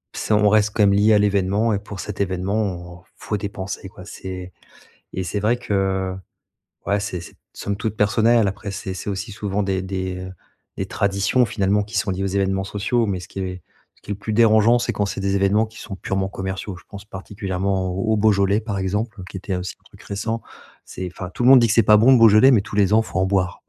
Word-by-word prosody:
c'est 110 - -1
on 105 0 +4
reste 105 0 +4
comme 105 -2 +3
lié 105 +2 +4
à 105 - +5
l'événement 105 +2 +1
et 100 - 0
pour 100 -2 -9
cet 100 +2 -5
événement, 95 -2 -2
faut 105 - -4
dépenser 100 -1 -5
quoi. 90 - -13
C'est 95 -2 -8 0.6
et 95 - -2
c'est 100 +3 -3
vrai 110 +4 +2
que 95 -5 -1 0.7
ouais, 100 +1 +1
c'est 95 -4 -4
c'est - - -12 0.2
somme 100 0 -4
toute 110 0 -3
personnel 110 +1 +3
après 100 +1 -6
c'est 100 -1 -5
c'est 100 - -5
aussi 100 +2 -4
souvent 105 0 -2
des 95 -1 -1
des, 95 -1 -4
heu, 95 0 -7 0.4
des - - -3
traditions 100 +5 +1
finalement 100 -1 +1
qui 105 +2 -5
sont 100 - 0
liées 95 +1 -3
aux - - 0
événements 95 0 0
sociaux 105 +4 0
mais 95 -4 -2
ce - - -11
qui - - -7
est 90 -2 -4 0.3
ce - - -29
qui - - -7
est - - -1
plus 105 +2 -5
dérangeant, 115 +1 +5
c'est - - -1
quand 105 - 0
c'est 100 - -4
des 100 0 0
événements 100 +3 +2
qui 110 +1 -16
sont 95 - -7
purement 95 0 -2
commerciaux, 95 0 -5
je 90 - -14
pense 100 0 -10
particulièrement 95 -1 -3
au 95 +4 0
au - - +1
Beaujolais, 100 -1 +3
par 105 -3 -4
exemple, 100 +2 -2
qui 95 - -7
était 95 0 -4
aussi 90 +1 -5
un - - -36
truc - - -18
récent. 110 +3 -3 0.4
C'est 95 - -6
enfin, 90 0 -7
tout 110 - -4
le 125 - +6
monde 135 -2 +9
dit 120 - +4
que 110 - +1
c'est 115 - +5
pas 105 0 +6
bon 120 +5 +6
le - - +6
Beaujolais, 115 +3 +7
mais 115 -6 +5
tous 105 - -8
les 100 -1 +3
ans, 110 - +5
il - - -6
faut 95 - -3
en 95 - +2
boire. 95 -2 -1
100 Hz, 240 wpm, -21 LUFS, 95-105 Hz, 0.7 s, monde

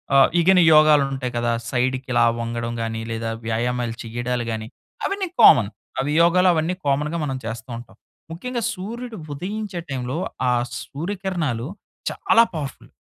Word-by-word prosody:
ఆహ్, 135 -1 +7
ఇగని 180 +1 +5
యోగాలు 155 -1 +6
ఉంటాయి 130 -2 -3
కదా. 120 0 +1 0.2
సైడ్‌కి 130 +1 -1
ఇలా 120 - +4 0.2
వంగడం 115 0 -3
గాని 115 0 -3
లేదా 115 0 -3 0.2
వ్యాయామాలు 120 +1 -1
చెయ్యడాలు 120 +1 -2
గాని 110 0 -4 0.4
అవన్నీ 395 -1 -1
కామన్ 105 -3 +8 0.3
అవి 140 +2 0
యోగాలు 180 +2 +5
అవన్నీ 165 +2 0
కామన్‌గా 150 +4 0
మనం 135 -2 -2
చేస్తూ 115 +2 -6
ఉంటాం. 120 - -12 0.4
ముఖ్యంగా 240 +8 -4
సూర్యుడు 225 +4 -6 0.2
ఉదయించే 195 +4 -4
టైంలో 130 +1 -3 0.3
ఆ - - +3 0.3
సూర్యకిరణాలు 170 - -3 0.4
చాలా 230 -12 +4
పవర్‌ఫుల్. 145 -4 -6
135 Hz, 140 wpm, -22 LUFS, 120-180 Hz, 0.4 s, కామన్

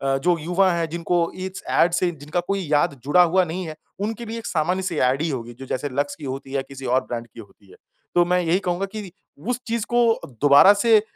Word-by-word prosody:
अ, - - +1
जो 175 +5 +1
युवा 180 +4 +2
हैं 165 -1 -1
जिनको 170 +1 0
इस 185 0 -6
ऐड 170 - +3
से 175 0 +1
जिनका 150 +2 -4
कोई 195 0 0
याद 145 -2 +2
जुड़ा 175 +5 +5
हुआ 185 +2 +3
नहीं 175 +3 -4
है 155 - -7 0.3
उनके 225 +3 -3
लिए 225 +1 -5
एक 230 - -11
सामान्य 180 +3 0
सी 180 -3 -2
ऐड 130 +3 +2
ही 165 - 0
होगी 120 -4 -5
जो 135 +3 -10
जैसे 130 +2 -3
लक्स 145 +2 -2
की 155 - -10
होती 135 +1 -5
है 135 - -6
या 135 - +1
किसी 135 -1 -10
और 125 +2 +2
ब्रांड 120 -1 -5
की 115 - -15
होती 100 -2 -15
है। - - -15 0.4
तो 175 - +6
मैं 180 +1 +2
यही 175 +2 +1
कहूँगा 180 +1 -1
कि 195 -2 -8 0.4
उस 250 0 0
चीज़ 230 -1 -1
को 235 -2 +3 0.2
दोबारा 145 +8 +8
से 215 +1 +4
170 Hz, 245 wpm, -23 LUFS, 140-190 Hz, 0.4 s, दोबारा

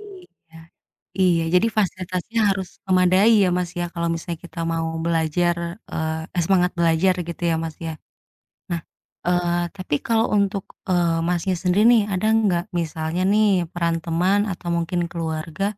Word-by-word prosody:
Iya. 365 - -15 0.6
Iya, 175 -3 +3
jadi 180 +5 +5
fasilitasnya 185 +2 -1
harus 190 -2 -2 0.2
memadai 185 +4 +5
ya - - +2
Mas 180 -1 -2
ya, 175 - -1
kalau 170 0 -1
misalnya 165 0 -5
kita 170 - -8
mau 165 0 -1 0.2
belajar, 170 +1 +1 0.4
eee, 160 +2 -2
semangat 180 -1 +2
belajar 170 +2 +3
gitu 170 - -7
ya 165 - +1
Mas 160 -2 -6
ya. 160 - -4 0.8
Nah, 170 -1 -1 0.5
eee, 175 -1 +1
tapi 185 -6 -1
kalau 225 0 +2
untuk, 200 -1 0 0.3
eee, 170 -2 +2
Masnya 180 +1 0
sendiri 185 +4 +2
nih, 225 -3 +5
ada 185 +3 0
nggak 190 -6 +2 0.2
misalnya 160 +2 -3
nih 215 0 +4 0.3
peran 170 -1 0
teman 180 +5 +2
atau 175 -1 -6
mungkin 170 +1 -1
keluarga 160 +1 -3
175 Hz, 150 wpm, -22 LUFS, 165-190 Hz, 0.8 s, jadi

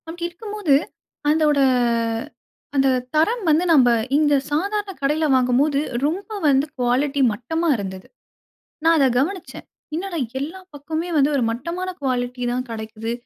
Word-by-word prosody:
அப்டி 340 +1 -7
இருக்கும்போது, 410 -4 0 0.5
அந்தோட 300 -2 +3 1.2
அந்த 270 -1 +4 0.3
தரம் 430 +10 +2
வந்து 310 +3 +4
நம்ப 260 -6 +6 0.3
இந்த 295 -1 +3 0.2
சாதாரண 400 +6 -1
கடையில 300 +3 +1
வாங்கும்போது 260 +3 +2 0.3
ரொம்ப 365 +8 -2 0.2
வந்து 275 0 +4
குவாலிட்டி 265 +3 +1
மட்டமா 320 +11 -2
இருந்தது. 190 -2 -6 0.8
நான் 330 0 +5
அத 275 - +5
கவனிச்சேன். 355 +7 -3 0.3
"என்னடா 350 +1 -3 0.2
எல்லா 325 +7 -5
பக்கமுமே 315 +4 -4
வந்து 285 0 +4
ஒரு 265 - +1
மட்டமான 340 +10 -4
குவாலிட்டி 250 -2 -2
தான் 255 +1 -2
கிடைக்குது. 220 0 -5
295 Hz, 125 wpm, -22 LUFS, 255-335 Hz, 1.2 s, நம்ப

